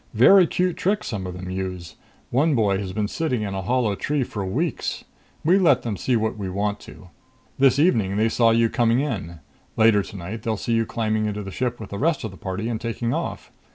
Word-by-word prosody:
Very 180 - +7
cute 180 +1 0
tricks 205 +3 0
some 95 -4 -4
of 90 - -6
them 90 0 -6
use 95 -2 -5 0.4
one 145 +4 +3
boy 100 -4 +2
has 95 -2 -4
been 105 +2 -1
sitting 125 -3 -2
in 100 -2 -3
a 95 - -3
hollow 120 +1 +1
tree 145 +7 -1
for 105 -4 -5
weeks. 95 0 -2 0.4
We 180 +5 +4
let 145 -9 +4
them 115 -4 -2
see 125 +5 0
what 110 -1 -1
we 95 -2 -3
want 100 +2 -2
to. 90 - -13 0.5
This 135 -1 +5
evening 110 - +2
they 110 +1 +3
saw 115 0 +3
you 115 0 +4
coming 115 0 +2
in. 85 - -4 0.4
Later 110 -2 +5
tonight 100 +3 -7
they'll 110 -2 -2
see 115 - -2
you 115 -1 +1
climbing 110 -2 -1
into 105 0 -3
the 95 - -7
ship 120 +3 -2
with 110 - -9
the 100 - -4
rest 160 +1 +1
of 110 - -4
the - - -12
party 95 +3 -4
and 115 -1 -3
taking 115 0 -2
off. - - -4
110 Hz, 225 wpm, -23 LUFS, 100-125 Hz, 0.5 s, Very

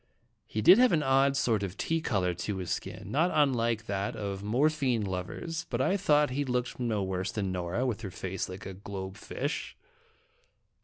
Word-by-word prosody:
He 110 - -2
did 185 - +9
have 250 -4 +5
an 155 -2 +3
odd 135 0 +3
sort 115 -6 +2
of 95 -2 -4
tea 165 0 0
color 95 - 0
to 95 +3 -3
his 90 -2 -4
skin, 100 - -4
not 160 +7 +3
unlike 120 -6 +2
that 100 -1 -2
of 100 -3 -4
morphine 130 +1 +1
lovers, 95 - -4
but - - -2
I 195 - +2
thought 150 -7 +3
he 140 +3 0
looked 125 -2 -2
no 110 -5 0
worse 95 0 -2
than 100 -3 -2
Nora, 90 +7 -1
with 115 -3 -2
her 100 - -5
face 95 +1 -4
like 95 +2 -8
a 95 - -6
globe 95 0 -6
fish. - - -4
110 Hz, 190 wpm, -30 LUFS, 95-140 Hz, -, did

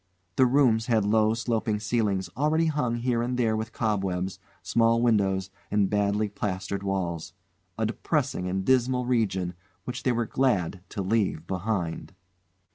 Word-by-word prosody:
The 130 - +5
rooms 120 -4 +3
had 110 -4 +2
low 110 +1 +3
sloping 115 -2 -1
ceilings 105 -3 0
already 155 +3 +2
hung 145 -7 0
here 120 0 0
and 125 +1 -1
there 115 -3 +2
with 110 +1 -3
cobwebs, 95 -5 -1 0.2
small 115 0 +3
windows, 95 -5 +1 0.2
and 105 -2 +1
badly 105 +1 +1
plastered 100 -1 -3
walls 90 -4 -3 0.4
a - - 0
depressing 90 - -1
and 95 +1 -2
dismal 125 -1 +2
region 100 -8 0 0.3
which 125 +1 -5
they 130 - +1
were 120 -1 0
glad 105 -8 0
to 100 - -4
leave 95 -5 0
behind. 90 -1 -3
110 Hz, 145 wpm, -27 LUFS, 95-120 Hz, 0.4 s, The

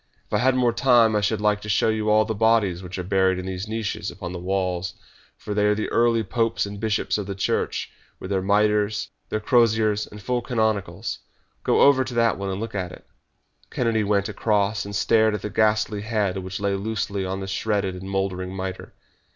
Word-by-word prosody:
"If - - -15
I 105 - +3
had 130 +2 +3
more 125 -2 +2
time 120 -3 +4
I 105 - +2
should 105 0 0
like 105 0 +2
to 105 - -7
show 105 +2 +3
you 110 -1 0
all 110 0 +4
the 110 - -2
bodies 110 -5 +2
which 90 0 -7
are 90 - -3
buried 95 0 +2
in 90 - -5
these 95 +2 -4
niches 110 -1 -3
upon 90 0 -7
the 90 - -5
walls, 95 +1 -2 0.4
for 105 - -5
they 105 0 +2
are 105 - +3
the 110 - -2
early 115 -1 +2
popes 115 +2 0
and 100 0 -7
bishops 110 -1 0
of 100 - -5
the 100 - -4
Church, 95 - -1 0.3
with 95 - -7
their 95 -1 +1
mitres, 105 +1 +1 0.2
their 110 - -1
croziers, 110 -2 +2
and 105 - -11
full 125 +4 -1
canonicals. 110 -5 -1 0.4
Go - - +3
over 140 -2 +6
to 125 -1 -7
that 115 -4 +2
one 100 0 -3
and 95 0 -3
look 115 +1 -5
at 90 -3 -3
it!" - - -13 0.6
Kennedy 115 -3 0
went 100 -1 +1
across, 105 0 0
and 100 0 -6
stared 110 +2 +3
at 105 - -6
the 105 - -4
ghastly 105 0 +1
head 105 -3 -1
which 95 +1 -5
lay 100 -1 0
loosely 100 -1 -2
on 95 +1 -3
the 95 - -4
shredded 100 -1 -1
and 95 +1 -8
mouldering 95 -1 -2
mitre. 95 0 -6
105 Hz, 215 wpm, -24 LUFS, 95-110 Hz, 0.6 s, over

